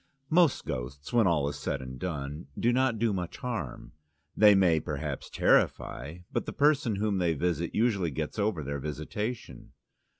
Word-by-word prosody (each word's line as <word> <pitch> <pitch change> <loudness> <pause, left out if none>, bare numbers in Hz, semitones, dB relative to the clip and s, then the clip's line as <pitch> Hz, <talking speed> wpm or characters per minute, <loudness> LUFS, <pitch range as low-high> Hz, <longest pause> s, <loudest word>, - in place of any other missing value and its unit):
Most 165 -3 +4
ghosts, 65 - -5
when 115 -4 +5
all 75 -5 +2
is 70 - -4
said 70 - -2
and 65 -1 -8
done, 75 -4 -4
do 120 +1 +2
not 130 -2 +2
do 115 -1 +1
much 90 -3 -4
harm; 115 - -5 0.4
they 105 -1 +7
may 90 -5 +4
perhaps 75 -2 -4
terrify, 75 +5 +1
but - - -2
the - - -4
person 145 -6 +3
whom 100 -1 0
they 85 -2 +1
visit 85 +1 -1
usually 105 -7 +2
gets 80 +7 -4
over 100 -6 0
their 70 +1 -3
visitation. 75 - -5
85 Hz, 165 wpm, -29 LUFS, 75-110 Hz, 0.4 s, they